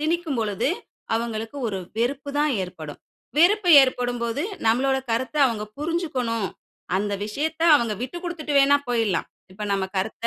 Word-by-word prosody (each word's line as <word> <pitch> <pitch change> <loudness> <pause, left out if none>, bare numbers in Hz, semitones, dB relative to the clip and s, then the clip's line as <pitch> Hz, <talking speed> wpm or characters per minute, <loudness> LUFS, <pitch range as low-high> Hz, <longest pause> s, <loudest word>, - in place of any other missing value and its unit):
திணிக்கும் 320 -3 -1
பொழுது, 220 +4 0 0.5
அவங்களுக்கு 225 +2 -3
ஒரு 195 -2 -3 0.2
வெறுப்புதான் 280 +4 0
ஏற்படும். 155 -5 -8 0.4
வெறுப்ப 370 +4 +4 0.2
ஏற்படும் 245 -2 -1
போது 235 +6 -1 0.2
நம்மளோட 265 +4 +3
கருத்த 260 +6 -1
அவங்க 215 -3 -2
புரிஞ்சுக்கணும், 265 - -1 0.5
அந்த 205 +1 -1
விஷயத்த 310 +9 -3
அவங்க 235 -5 -1
விட்டுக்கொடுத்துட்டு 335 +1 -4
வேணா 285 +1 +5
போயிரலாம். 225 -7 0 0.2
இப்ப 210 +3 -9
நம்ம 195 -1 0
கருத்த 220 +4 -2
245 Hz, 130 wpm, -24 LUFS, 220-300 Hz, 0.5 s, வேணா